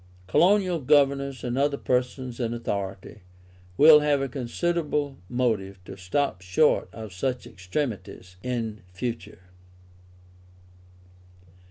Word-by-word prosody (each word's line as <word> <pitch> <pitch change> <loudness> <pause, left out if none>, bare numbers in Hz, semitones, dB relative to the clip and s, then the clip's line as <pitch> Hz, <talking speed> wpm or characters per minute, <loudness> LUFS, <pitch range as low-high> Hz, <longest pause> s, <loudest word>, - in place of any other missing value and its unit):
Colonial 180 - +3
governors 140 -1 +2
and 125 +1 -1
other 140 0 +1
persons 125 -1 -2
in 120 -1 -1
authority, 100 -3 -5 0.6
will 150 0 +9
have 150 -1 +2
a 135 - -1
considerable 145 +2 -2
motive 110 -6 -1
to 95 - -8
stop 95 +3 -1
short 90 +12 +2
of 110 -4 -9
such 125 +7 -2
extremities 95 -2 -5
in 115 -3 -3
future. 115 -1 -5
125 Hz, 100 wpm, -26 LUFS, 105-145 Hz, 0.6 s, will